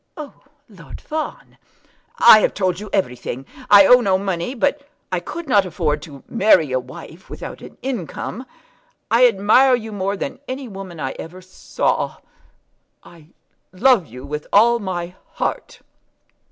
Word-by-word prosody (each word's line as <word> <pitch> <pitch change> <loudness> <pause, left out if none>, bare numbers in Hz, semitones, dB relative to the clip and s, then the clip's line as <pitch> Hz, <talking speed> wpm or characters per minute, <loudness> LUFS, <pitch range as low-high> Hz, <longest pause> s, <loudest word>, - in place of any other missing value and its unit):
"Oh, 300 -3 -8 0.3
Lord 185 - -12
Fawn!" 310 0 -6 0.6
"I 215 - +8
have - - 0
told 185 -2 -1
you 210 0 -8
everything. 125 -6 -3 0.2
I 200 -1 +8
owe 250 +4 +7
no 190 -5 +2
money, 190 +4 -3
but 285 +3 -1 0.2
I 180 - 0
could 335 - -8
not 205 -6 +4
afford 155 -5 -2
to 145 -4 -12
marry 190 - +3
a 130 - +1
wife 130 +7 -12
without - - -8
an - - -13
income. 250 - -5 0.6
I 240 +2 +6
admire 235 +5 +4
you 225 -2 -7
more 200 0 -2
than - - -5
any 260 0 -5
woman 190 -5 -9
I 130 - -3
ever 175 +3 -9
saw. 185 0 -3 0.9
I 165 -3 -17 0.4
love 220 -1 +3
you 125 +3 -11
with 150 +1 -6
all 235 +3 +5
my 180 -4 -5 0.2
heart." - - -4
195 Hz, 150 wpm, -20 LUFS, 170-235 Hz, 0.9 s, I